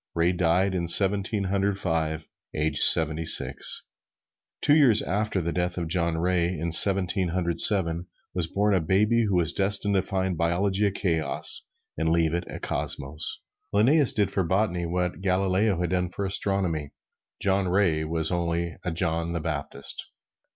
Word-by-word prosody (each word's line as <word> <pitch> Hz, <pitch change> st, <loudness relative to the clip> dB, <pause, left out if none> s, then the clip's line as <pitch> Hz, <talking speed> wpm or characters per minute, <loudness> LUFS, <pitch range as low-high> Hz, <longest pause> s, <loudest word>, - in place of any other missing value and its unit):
Ray 85 Hz, +1 st, +1 dB
died 90 Hz, +2 st, 0 dB
in 85 Hz, -2 st, -3 dB
Seventeen 100 Hz, +3 st, +3 dB
Hundred 100 Hz, +1 st, -1 dB
Five, 80 Hz, -3 st, -3 dB, 0.3 s
aged 75 Hz, 0 st, -1 dB
seventy 80 Hz, 0 st, +5 dB
six. 80 Hz, -, +2 dB, 0.7 s
Two 145 Hz, -, +3 dB
years 130 Hz, -9 st, +4 dB
after 105 Hz, 0 st, -2 dB
the 85 Hz, 0 st, -3 dB
death 90 Hz, 0 st, -3 dB
of 85 Hz, -2 st, -3 dB
John 85 Hz, -1 st, 0 dB
Ray, 90 Hz, +1 st, -1 dB
in 85 Hz, +2 st, -4 dB
Seventeen 95 Hz, +1 st, +5 dB
Hundred 85 Hz, -1 st, -3 dB
Seven, 85 Hz, -4 st, +3 dB, 0.3 s
was 90 Hz, -3 st, -1 dB
born 105 Hz, +3 st, 0 dB
a 95 Hz, -, +2 dB
baby 105 Hz, +7 st, +1 dB
who 100 Hz, -3 st, -1 dB
was 85 Hz, -2 st, +1 dB
destined 100 Hz, +1 st, 0 dB
to 95 Hz, -, +2 dB
find 95 Hz, -1 st, -3 dB
biology 95 Hz, +5 st, 0 dB
a -, -, -1 dB
chaos, 80 Hz, -7 st, -1 dB, 0.3 s
and 80 Hz, 0 st, 0 dB
leave 80 Hz, -1 st, +1 dB
it 85 Hz, +1 st, -3 dB
a -, -, -8 dB
cosmos. 70 Hz, +3 st, -1 dB, 0.3 s
Linnæus 130 Hz, +7 st, +2 dB
did 100 Hz, -2 st, 0 dB
for 95 Hz, -, -1 dB
botany 90 Hz, -1 st, -1 dB
what 90 Hz, 0 st, -3 dB
Galileo 95 Hz, +1 st, 0 dB
had 90 Hz, -1 st, -2 dB
done 90 Hz, -1 st, -1 dB
for 100 Hz, +3 st, -5 dB
astronomy. 95 Hz, -6 st, -2 dB, 0.5 s
John 95 Hz, -1 st, 0 dB
Ray 90 Hz, -4 st, +1 dB
was 80 Hz, +1 st, -1 dB
only 85 Hz, -1 st, -3 dB
a 90 Hz, -, -3 dB
John 85 Hz, 0 st, -2 dB
the 85 Hz, -, -3 dB
Baptist. 70 Hz, -3 st, -6 dB
90 Hz, 165 wpm, -25 LUFS, 85-100 Hz, 0.7 s, seventy